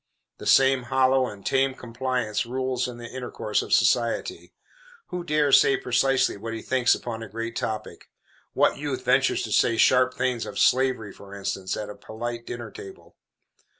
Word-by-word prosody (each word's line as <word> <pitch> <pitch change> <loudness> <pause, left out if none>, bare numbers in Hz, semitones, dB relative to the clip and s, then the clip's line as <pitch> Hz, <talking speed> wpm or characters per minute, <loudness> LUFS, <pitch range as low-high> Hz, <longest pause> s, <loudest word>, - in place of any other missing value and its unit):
The - - -7
same 135 -2 +4
hollow 130 0 +3
and 100 -3 -10
tame 135 0 +1
complaisance 125 -3 -2
rules 130 +1 -2
in 125 -1 -8
the 120 - -9
intercourse 125 -4 -3
of - - -8
society. 120 - +1 0.6
Who 180 -1 -4
dares 150 -4 +4
say 135 - +2
precisely 130 -1 +1
what 115 +2 -6
he 110 - -7
thinks 130 -2 +2
upon 115 -2 -6
a 115 - -8
great 115 +1 -5
topic? 110 -1 -5 0.4
What - - +2
youth - - -4
ventures - - +2
to - - -5
say 115 - +3
sharp 130 +2 +4
things, 125 -3 -1
of - - -7
slavery, 130 -5 +2
for 100 0 -12
instance, 95 -1 -3
at 105 - -4
a - - -10
polite 115 +3 -6
dinner 120 0 -6
table? 395 -2 -12
125 Hz, 170 wpm, -25 LUFS, 115-130 Hz, 0.6 s, same